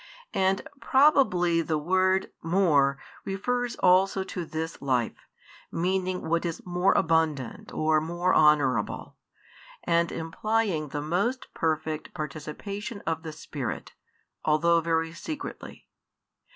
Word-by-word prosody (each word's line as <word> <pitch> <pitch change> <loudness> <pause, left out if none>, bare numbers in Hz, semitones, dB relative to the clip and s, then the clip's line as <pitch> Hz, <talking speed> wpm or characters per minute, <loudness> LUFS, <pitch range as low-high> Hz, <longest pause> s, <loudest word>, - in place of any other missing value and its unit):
And 190 +8 +1
probably 255 - +4
the 160 -1 -1
word 185 +4 +1
more 160 -6 +3 0.3
refers 245 +5 -2
also 190 +1 +3
to 180 -2 -5
this 160 +1 -5
life, 125 -4 -1 0.4
meaning 185 +1 -1
what 170 +1 +1
is 170 -2 -4
more 180 +2 +2
abundant 160 -7 0
or 155 0 +2
more 175 +3 0
honourable, 140 -7 +2 0.7
and 170 0 +2
implying 170 0 -1
the 145 +1 -4
most 200 - -1
perfect 155 0 -2
participation 170 +8 -6
of 160 -1 -1
the 160 -1 -6
Spirit, 150 -4 -6 0.5
although 165 +2 +3
very 165 0 0
secretly. 300 - -7
170 Hz, 110 wpm, -27 LUFS, 155-190 Hz, 0.7 s, probably